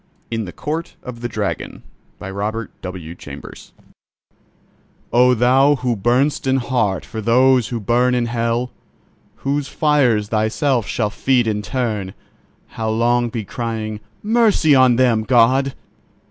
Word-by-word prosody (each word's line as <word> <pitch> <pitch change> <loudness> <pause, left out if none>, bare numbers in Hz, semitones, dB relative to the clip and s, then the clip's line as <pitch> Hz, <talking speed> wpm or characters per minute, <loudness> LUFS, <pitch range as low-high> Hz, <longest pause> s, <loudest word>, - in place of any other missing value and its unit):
IN 115 -1 -2
THE 90 - -7
COURT 160 - -5
OF 120 -2 -8
THE 120 - -2
DRAGON 105 -3 -4 0.4
"Oh, 105 +3 -3 2.7
thou 130 +5 +4
who 125 -3 -1
burn'st 125 +8 +1
in 130 0 +3
heart 120 - -1
for 110 -2 -6
those 125 +2 +3
who 120 - -4
burn 120 +4 +2
In 120 -1 +1
Hell, 115 +1 -1 0.6
whose 140 +1 -2
fires 130 -11 +1
thyself 115 - 0
shall 105 -3 -1
feed 125 +2 +1
in 105 -2 -1
turn; 105 -4 -3 0.5
How 110 -1 -4
long 120 +2 +1
be 110 -2 -5
crying—'Mercy 115 - 0
on 130 -2 +5
them.' 120 -3 +3
God! 130 +3 +3
120 Hz, 120 wpm, -19 LUFS, 110-130 Hz, 2.7 s, on